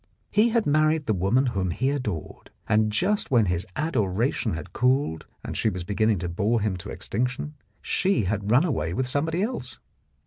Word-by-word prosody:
He 215 +3 +4
had 230 -2 +1
married 155 +1 +2
the 110 - +1
woman 100 +8 +2
whom 95 -7 -1
he 130 +10 0
adored, 110 - -4 0.2
and 110 0 +3
just 195 - +1
when 120 -5 +4
his 90 +2 -1
adoration 115 - 0
had 85 - -8
cooled 125 - +1 0.2
and - - -5
she 110 - +1
was 90 -3 -4
be 100 - -4
ginning 110 0 +2
to 90 - -2
bore 105 +7 +1
him 105 -2 -1
to 90 - -8
extinction, 125 +6 -3 0.3
she 195 - +1
had 100 +1 -2
run 125 +7 +5
away 85 - -1
with 130 +3 0
somebody 160 +7 0
else. 130 - -4
120 Hz, 185 wpm, -25 LUFS, 100-145 Hz, 0.3 s, run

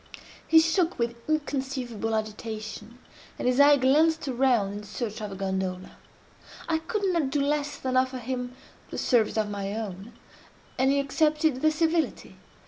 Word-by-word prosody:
He 325 - +7
shook 330 +2 +1
with 235 0 -1
inconceivable 265 -7 -2
agitation, 215 +1 -5 0.4
and - - -2
his 250 +2 +2
eye 285 0 +7
glanced 305 +4 +3
around 245 -6 +2
in 205 +1 -6
search 215 +1 -5
of 210 -1 -5
a - - -6
gondola. 190 -1 -3 0.8
I 320 -1 +1
could 400 +6 -3
not 315 -6 +1
do 290 +2 0
less 290 0 0
than 260 -1 -3
offer 255 0 +2
him 250 0 -4 0.3
the - - -6
service 230 -4 +2
of 215 -1 0
my 200 0 -3
own; 210 0 -6 0.7
and 265 +1 +4
he 280 - +2
accepted 300 0 +1
the 310 - +5
civility. 320 +1 -1
255 Hz, 155 wpm, -27 LUFS, 215-295 Hz, 0.8 s, He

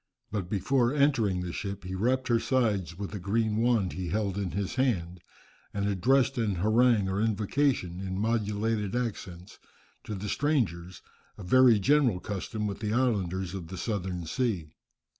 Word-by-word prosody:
But 100 -4 -3
before 120 +6 +1
entering 115 -11 +2
the 90 -1 -5
ship 100 0 -5
he 90 +1 -6
rapped 125 +7 0
her 115 -1 +4
sides 110 -8 0
with 100 0 -5
a 105 - -4
green 105 +3 0
wand 115 -5 +2
he 90 -1 -4
held 100 +1 -1
in 100 -2 -2
his 100 +2 -3
hand, 95 -10 0 0.6
and 100 0 0
addressed 125 +7 +2
an 105 -4 0
harangue 110 +2 +3
or 95 +2 -1
invocation 110 -3 0
in 95 -1 -4
modulated 110 0 -1
accents, 100 -7 -5 0.5
to 105 - -4
the 100 +2 -5
strangers, 95 - -1 0.3
a 105 - -9
very 125 +4 +6
general 130 -3 +3
custom 105 +2 -4
with 100 -1 -3
the 105 -1 -2
islanders 95 -7 0
of 90 -4 -6
the 95 - -7
southern 95 -5 -3
sea. 90 -6 -2
105 Hz, 160 wpm, -28 LUFS, 95-120 Hz, 0.6 s, very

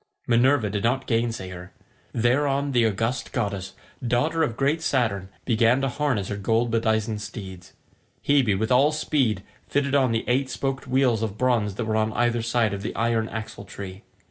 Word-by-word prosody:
Minerva 120 -2 +3
did 100 -1 -2
not 130 +3 +1
gainsay 115 -5 -1
her. 90 0 -10 0.4
Thereon 140 +4 +1
the 120 -3 +3
august 115 +4 -2
goddess, 100 -2 -3 0.3
daughter 135 +7 +1
of 120 -7 0
great 145 +4 +1
Saturn, 110 - 0 0.2
began 115 +1 +3
to 135 - 0
harness 130 -8 -1
her 105 - -3
gold 115 +4 +1
bedizened 110 -1 0
steeds. 95 -5 -8 0.5
Hebe 130 -9 +3
with 110 +3 -1
all 135 +4 +5
speed 135 -10 0 0.2
fitted 140 -1 0
on 135 -4 +3
the 115 0 -1
eight 130 +2 +1
spoked 135 0 -3
wheels 130 -3 +2
of 110 -2 -3
bronze 115 -5 +1
that 115 - -3
were 110 0 0
on 110 0 0
either 120 0 +1
side 115 -2 +1
of 100 - -4
the 110 - -4
iron 115 -1 0
axle 110 -2 -6
tree. 100 -1 -8
115 Hz, 175 wpm, -25 LUFS, 105-130 Hz, 0.5 s, all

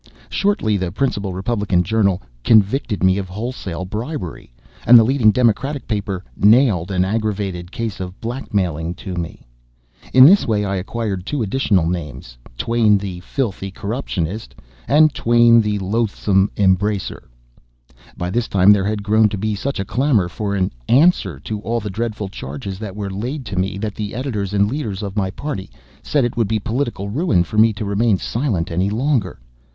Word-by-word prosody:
Shortly 155 - +1
the 90 -2 -3
principal 105 -4 -1
Republican 95 -1 0
journal 100 - +1 0.2
"convicted" 110 - +2
me 95 +1 +4
of 95 -2 -5
wholesale 95 -4 -5
bribery, 105 - -6 0.3
and 120 - +8
the 115 - +7
leading 125 -2 +3
Democratic 125 +5 +1
paper 100 -4 -3
"nailed" 105 -5 +4
an 95 -1 +1
aggravated 100 -4 -2
case 115 -4 -4
of 90 0 -7
blackmailing 90 - -2
to 95 - -7
me. 85 -2 -6 0.7
[In 130 0 +8
this 195 +7 +6
way 105 -2 +1
I 100 -1 -1
acquired 100 -1 -3
two 135 +4 -2
additional 100 -5 +1
names: 75 -8 -5 0.2
"Twain 115 - +3
the 95 -3 -5
Filthy 100 -1 -3
Corruptionist" 100 - -4 0.3
and 155 +1 +5
"Twain 120 0 +5
the 105 -1 -1
Loathsome 100 -1 +1
Embracer."] 100 +1 0 0.9
By 90 +1 -3
this 115 +3 0
time 95 +1 +5
there 100 -2 +3
had 105 0 -2
grown 110 +1 +3
to 100 - -4
be 110 +2 -1
such 130 +6 -3
a 95 - -2
clamor 120 -4 +1
for 100 +2 -3
an 95 -2 0 0.2
"answer" 160 +9 +3
to 105 -1 -4
all 115 +2 -2
the 105 -2 -5
dreadful 110 0 -3
charges 95 +3 -7
that 105 -3 -6
were 100 -2 -4
laid 125 +8 -4
to 100 - -5
me 95 +1 -1
that 105 0 -3
the 105 0 -5
editors 110 -7 -3
and 100 0 +2
leaders 110 -6 -4
of 100 -1 -5
my 95 -3 0
party 100 -1 -5 0.3
said 145 -4 +1
it 120 - -3
would 115 -3 +1
be 110 +2 0
political 115 -1 -3
ruin 110 - +2
for 105 +5 -2
me 110 +1 +6
to 105 +1 -5
remain 100 +1 +2
silent 110 - -2
any 90 +4 0
longer. 115 - -1
105 Hz, 170 wpm, -19 LUFS, 95-115 Hz, 0.9 s, and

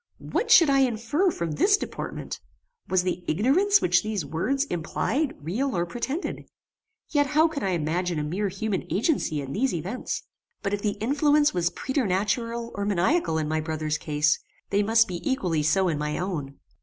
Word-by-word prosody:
What 470 - -2
should 340 -7 +8
I 275 - +4
infer 260 - +1
from 170 - -3
this 400 - +3
deportment? - - -6 0.5
Was 185 -1 +2
the 180 0 -2
ignorance 335 - +3
which 180 0 +4
these 210 -7 -3
words 180 - 0
implied 265 - -1
real 220 - -2
or 170 - +1
pretended? 265 - -4 0.6
Yet 290 -2 +3
how 305 +3 +4
could 310 -3 -5
I 190 -5 0
imagine 170 +2 -1
a 150 - -1
mere 185 +7 -1
human 195 0 -3
agency 195 - 0
in 135 0 -6
these 250 -2 0
events? 190 +10 -4 0.4
But 200 -1 -1
if 205 - -1
the 205 -1 0
influence 290 +5 +3
was 175 -1 +1
preternatural 230 0 -1
or 200 - -3
maniacal 200 - +1
in 155 -1 -1
my 155 +1 0
brother's 155 -1 -2
case, 150 0 +1 0.3
they 200 +1 +3
must 225 +2 +4
be 175 -2 -5
equally 180 - 0
so 170 +6 +2
in 155 -4 -1
my 150 0 -2
own. 155 -7 -4
200 Hz, 175 wpm, -26 LUFS, 165-270 Hz, 0.6 s, should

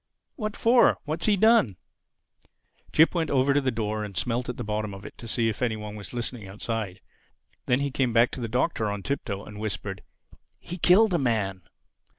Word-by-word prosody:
"What 215 -4 -4
for?—What's 195 -9 +3
he 205 -2 +4
done?" 220 - +4 1.1
Jip 160 +1 +5
went 165 -3 0
over 135 0 +3
to 145 - +3
the 135 - +1
door 110 -2 -2
and 100 -3 -7
smelt 120 +5 -1
at 125 - -4
the - - -4
bottom 105 -1 -3
of 100 +1 -11
it - - -9
to 115 - -8
see 115 0 +1
if 110 +1 -3
any 120 -3 +1
one 105 -1 -7
were 105 - -8
listening 120 -4 -4
outside. 105 -2 -4 0.7
Then 125 +2 +2
he 140 0 -1
came 130 -2 +1
back 115 +1 +4
to 130 - -6
the 115 - -2
Doctor 120 -2 0
on 100 -1 -4
tiptoe 105 -8 -3
and 105 0 -10
whispered, 100 -2 -4 0.6
"_He 175 0 -7
killed 200 +3 +6
a 170 - +2
man! 105 -7 0
115 Hz, 195 wpm, -26 LUFS, 105-140 Hz, 1.1 s, killed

